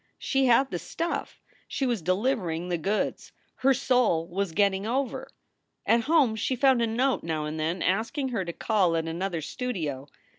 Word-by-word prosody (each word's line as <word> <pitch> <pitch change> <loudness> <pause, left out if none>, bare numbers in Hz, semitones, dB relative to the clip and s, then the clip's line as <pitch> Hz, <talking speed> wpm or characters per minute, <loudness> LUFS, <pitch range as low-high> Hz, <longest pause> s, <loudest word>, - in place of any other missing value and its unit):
She 270 -1 +1
had 255 +3 +4
"the 175 - -2
stuff." 335 - -4 0.3
She 270 - -2
was 240 -6 0
deliver 185 +3 0
ing 165 +2 -3
the 175 -1 -1
goods. 200 +6 -2 0.2
Her 270 - +3
soul 245 -11 +2
was 190 +1 -2
getting 200 +2 +1
over. 260 +3 -2 0.6
At 230 0 +3
home 285 -7 +3
she 225 +4 -1
found 260 -1 +4
a 230 - +2
note 250 +4 +1
now 160 -2 -2
and 155 +1 -4
then 165 +3 -1
asking 230 +9 0
her 225 -6 -1
to 175 - -4
call 185 -2 +1
at 165 0 -1
another 170 +1 -2
studio. 155 - -4
205 Hz, 180 wpm, -27 LUFS, 170-250 Hz, 0.6 s, had